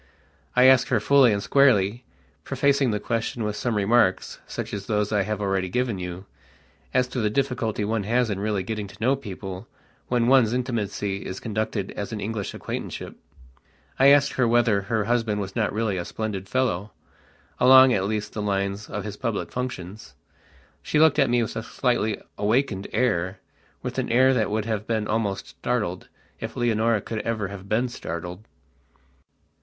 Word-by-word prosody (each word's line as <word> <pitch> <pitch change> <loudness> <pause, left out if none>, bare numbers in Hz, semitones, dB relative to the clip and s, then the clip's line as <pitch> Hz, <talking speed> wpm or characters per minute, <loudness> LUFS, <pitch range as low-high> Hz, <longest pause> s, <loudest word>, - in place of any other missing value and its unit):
I 125 - +6
asked 130 -1 +6
her 120 - +2
fully 135 +1 +5
and 100 -1 -1
squarelyprefacing 120 - +1
the 105 - -1
question 115 +1 -2
with 105 -1 -2
some 120 +1 -1
remarks, 100 -2 +2
such - - -5
as 100 -1 -5
those 105 -2 0
that 105 - +1
I - - +3
have 105 +1 -2
already 95 -2 -1
given 120 -1 -1
you, 90 +1 -6 0.7
as 125 0 +2
to 125 - -3
the 105 - +1
difficulty 115 -4 -1
one 110 +1 0
has 120 +1 +1
in 100 - -2
really 105 -2 -1
getting 105 +1 -4
to - - -14
know 130 +5 +2
people 95 -4 -7 0.4
when 120 -1 +1
one's 125 -3 +4
intimacy 105 -5 -2
is 95 - -6
conducted 110 -2 -3
as 100 +1 -5
an 110 - -4
English 105 0 -4
acquaintanceshipI - - -5 0.9
asked 140 +1 +6
her 125 -2 +2
whether 115 -3 +3
her 110 +2 -1
husband 115 -2 0
was 100 -1 -5
not 110 -3 +1
really 105 -3 -1
a 85 - -2
splendid 100 -3 -4
fellowalong 130 +3 +2
at 95 -3 +1
least 105 0 -3
the 105 - -3
lines 100 0 -2
of 105 - -4
his 105 -1 -6
public 115 -5 -3
functions. 110 -5 -6 0.7
She - - -1
looked 155 -1 +5
at 140 -3 +4
me 120 0 +3
with 110 - -5
a - - -2
slightly 115 -2 -1 0.2
awakened 105 -2 0
airwith 95 -5 -3
an - - -2
air 130 +2 +5
that 115 -4 +1
would 105 0 -1
have 110 -2 -3
been 110 -2 -1
almost 105 -3 -2
startled 105 -7 -3 0.3
if - - -6
Leonora 115 -2 +2
could 110 +2 -4
ever 110 -3 -2
have 100 0 -9
been 115 +4 +1
startled. 90 -3 -6
110 Hz, 170 wpm, -24 LUFS, 100-120 Hz, 0.9 s, I